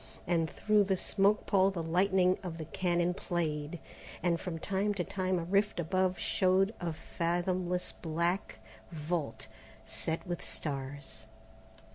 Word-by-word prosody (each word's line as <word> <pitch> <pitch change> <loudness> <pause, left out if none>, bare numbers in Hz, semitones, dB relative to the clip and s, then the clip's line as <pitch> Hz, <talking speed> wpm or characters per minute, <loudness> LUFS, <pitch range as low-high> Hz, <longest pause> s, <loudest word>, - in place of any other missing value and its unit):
And 165 -2 +1
through 210 -1 +3
the 190 -1 +1
smoke 200 +3 +2
pall 195 -1 +4
the 180 -4 -3
lightning 185 +2 +3
of 175 -4 -5
the 160 - -5
cannon 175 +1 +1
played, 160 -3 -2 0.4
while 175 -1 +3
from 170 -1 -4
time 200 +4 0
to 180 - 0
time 185 0 -1
a 170 - -1
rift 200 +3 +1
above 185 +2 +1
showed 190 +2 +2
a 170 -1 -2
fathomless 175 +3 -1
black 170 - -1 0.3
vault 155 -4 -3 0.4
set 160 +1 -2
with 175 -2 -4
stars. 135 -5 -5
175 Hz, 135 wpm, -32 LUFS, 165-190 Hz, 0.4 s, pall